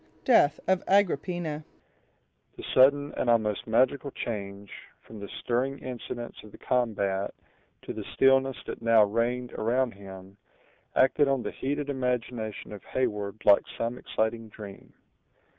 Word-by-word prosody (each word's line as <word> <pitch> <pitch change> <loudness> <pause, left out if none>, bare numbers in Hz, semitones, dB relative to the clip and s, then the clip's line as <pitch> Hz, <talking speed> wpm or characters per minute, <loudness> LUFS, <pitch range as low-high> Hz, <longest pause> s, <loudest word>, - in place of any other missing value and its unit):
—Death 190 - +5
of 190 0 +2
Agrippina 175 -5 +1 0.9
The - - -8
sudden 145 +2 +5
and 120 - 0
almost 110 -3 +1
magical 130 +5 +2
change, 100 -5 -6 0.3
from 110 - -12
the 100 - -7
stirring 130 +3 -1
incidents 120 -2 -7
of 105 - -13
the - - -13
combat 100 -5 -1 0.5
to - - -5
the - - -6
stillness 135 0 +4
that - - -6
now 115 -1 +6
reigned 120 +4 -1
around 120 +3 +1
him, 95 0 -12 0.6
acted 140 +2 +4
on 135 -3 +1
the - - -3
heated 145 +2 -3
imagination 125 -5 -3
of 100 - -9
Heyward 105 -4 -3
like 100 - +7 0.2
some 120 +2 -2
exciting 110 0 -2
dream. 105 -2 -11
120 Hz, 135 wpm, -28 LUFS, 105-135 Hz, 0.9 s, like